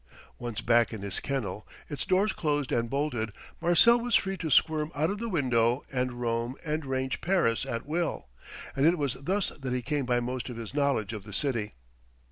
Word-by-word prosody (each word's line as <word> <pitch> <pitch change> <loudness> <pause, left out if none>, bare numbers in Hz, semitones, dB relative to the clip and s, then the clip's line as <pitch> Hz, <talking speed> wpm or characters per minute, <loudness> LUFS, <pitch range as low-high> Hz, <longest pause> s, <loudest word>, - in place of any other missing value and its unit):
Once 120 -3 -4
back 120 0 +4
in 110 -3 -6
his 100 -2 -3
kennel, 130 -6 -3 0.2
its 145 -3 -3
door 190 +2 +3
closed 145 -8 -1
and 115 0 +1
bolted, 130 -6 -1 0.3
Marcel 230 +8 +6
was 240 -1 +1
free 195 0 +2
to 165 -4 -4
squirm 155 +2 +3
out 155 +5 +1
of 205 - -4
the 230 0 -3
window 125 - +2
and 125 -2 -1
roam 120 +1 -1
and 155 -1 -1
range 130 0 -1
Paris 170 -12 +2
at 115 0 -3
will. 160 - -2 0.5
And 140 +3 +4
it 175 +2 +4
was 140 -5 0
thus 190 +8 -1
that 135 -3 -5
he 125 -1 -1
came 145 -1 -1
by 120 -1 +3
most 125 +1 -3
of 120 - -6
his 115 0 -7
knowledge 140 -7 +1
of 105 - -5
the 105 0 -10
city. 115 -5 -1
135 Hz, 200 wpm, -29 LUFS, 120-155 Hz, 0.5 s, Marcel